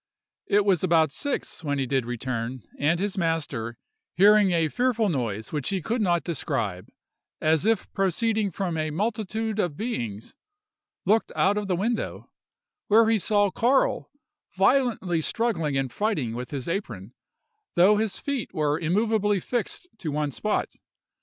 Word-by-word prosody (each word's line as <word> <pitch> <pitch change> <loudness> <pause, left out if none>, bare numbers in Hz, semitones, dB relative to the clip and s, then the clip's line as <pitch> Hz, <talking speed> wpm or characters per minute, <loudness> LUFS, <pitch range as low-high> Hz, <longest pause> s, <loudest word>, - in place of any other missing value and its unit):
It 205 0 +3
was 190 -4 +2
about 165 -4 +3
six 285 - -4
when 145 -2 -1
he 135 - 0
did 130 -2 0
return; 120 0 -4 0.2
and 160 +4 +2
his 200 0 -2
master, 145 -9 -2 0.4
hearing 205 +1 +6
a 165 -3 +2
fearful 235 - +1
noise 115 - -2
which 150 -3 -1
he 195 - 0
could 225 +7 -2
not 175 -4 +2
describe—"as 150 - -3
if 225 -3 +1
proceeding 210 +3 +1
from 175 -2 -3
a 155 0 -1
multitude 215 +4 -2
of 175 -7 -1
beings"—looked 225 - -4
out 195 +2 +3
of 210 -1 -2
the 185 - +1
window, 220 +6 -2 0.6
where 220 +2 +5
he 225 -1 +3
saw 205 0 +2
Carl 255 +7 +2 0.5
violently 195 -6 +2
struggling 165 -9 0
and 130 -3 -2
fighting 155 - -1
with 125 +1 -5
his 135 -3 -5
apron, 125 - -4 0.6
though 190 +4 +6
his 220 -2 -1
feet 280 -5 -4
were 150 0 +1
immoveably 205 +3 +1
fixed 240 - -3
to 160 - -3
one 150 0 -1
spot. 210 +10 -2
185 Hz, 145 wpm, -26 LUFS, 145-215 Hz, 0.6 s, hearing